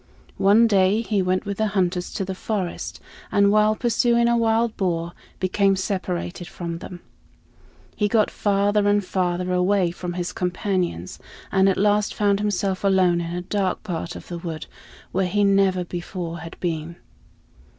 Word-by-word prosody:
One 205 +4 +6
day 200 0 +3
he 210 -3 0
went 185 +2 0
with 200 -1 -4
the 220 - +2
hunters 180 -1 0
to 195 - -1
the 190 - -4
forest, 190 -2 -4 0.3
and 200 -1 +4
while 215 +1 +4
pursuing 235 0 +2
a 235 - +3
wild 225 0 +2
boar, 170 -3 -1 0.3
became 195 +1 +2
separated 185 -2 -3
from 170 -1 -6
them. 180 0 -9 0.9
He 210 - +1
got 215 -1 +2
farther 205 0 +1
and 205 -1 +2
farther 180 -1 -1
away 180 0 +2
from 175 0 -5
his 175 0 -3
companions, 180 - -2 0.3
and 190 0 +4
at 190 - +1
last 210 +1 +2
found 200 -1 +2
himself 200 -2 -1
alone 185 -3 +3
in 170 +1 -4
a 180 - -3
dark 190 0 -1
part 170 -4 -4
of - - -10
the 175 -1 -5
wood 165 -2 -5 0.5
where 185 0 +1
he 205 +3 +1
never 195 -2 +3
before 175 -1 -5
had 165 +1 -10
been. 170 -1 -3
190 Hz, 160 wpm, -23 LUFS, 175-205 Hz, 0.9 s, One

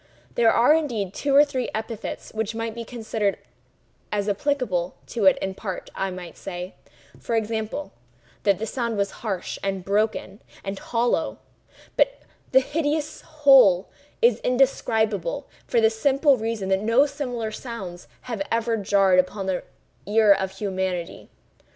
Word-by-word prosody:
There 230 -1 +4
are, 240 +6 +5
indeed, 235 - -1
two 280 +4 0
or 290 +1 +8
three 260 -4 -3
epithets 220 0 -5
which 220 0 -2
might 225 0 -3
be 235 +1 -6
considered 220 -3 -2 0.7
as 205 -1 -1
applicable 205 -5 0
to 225 -4 -2
it 190 - +6
in 190 - -2
part; 190 -2 -6
I 195 - -2
might 180 -3 -8
say, 180 -1 -6 0.5
for 230 - -2
example, 220 +5 -2 0.5
that 200 -2 +3
the 220 - -3
sound 235 -1 -2
was 200 -1 0
harsh, 195 -6 -3
and 195 -2 -3
broken 205 0 -1 0.2
and 195 0 -4
hollow; 240 0 0 0.6
but - - +2 0.3
the 265 - +6
hideous 300 +1 -2
whole 270 - +5 0.3
is 475 - +5
indescribable, 245 -2 +1 0.2
for 240 - +2
the 220 0 +4
simple 275 +5 +3
reason 220 -4 -3
that 190 0 +2
no 230 +6 +4
similar 250 -6 -4
sounds 195 -8 -7
have 230 -5 -5
ever 230 0 +1
jarred 195 -2 +4
upon 190 +2 0
the 190 -1 -1 0.5
ear 210 0 +6
of 190 -1 -2
humanity. 190 -4 -3
220 Hz, 145 wpm, -24 LUFS, 195-250 Hz, 0.7 s, or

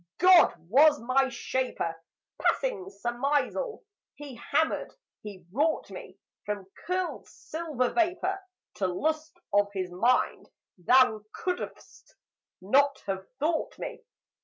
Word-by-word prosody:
"God 365 -1 +7
was 290 - +6
my 260 +3 +2
shaper. 245 -8 -2 0.5
Passing 480 -7 0
surmisal, 285 - -1 0.3
He 285 -2 -9
hammered, 315 +6 0 0.3
He 195 -4 -10
wrought 300 +8 0
me, - - -10 0.3
From 205 -2 -4 0.2
curled 365 0 -2
silver 305 -6 -3
vapour, 360 +2 +1 0.4
To 190 - +1
lust 310 - -2 0.2
of 205 0 +4
His 185 -2 -3
mind: 235 +8 +1 0.3
Thou 220 +2 +4
could'st 360 -1 -6 0.5
not 275 +8 +3
have 190 -1 -4
thought 315 +3 -1
me! - - -6
270 Hz, 110 wpm, -28 LUFS, 215-325 Hz, 0.5 s, God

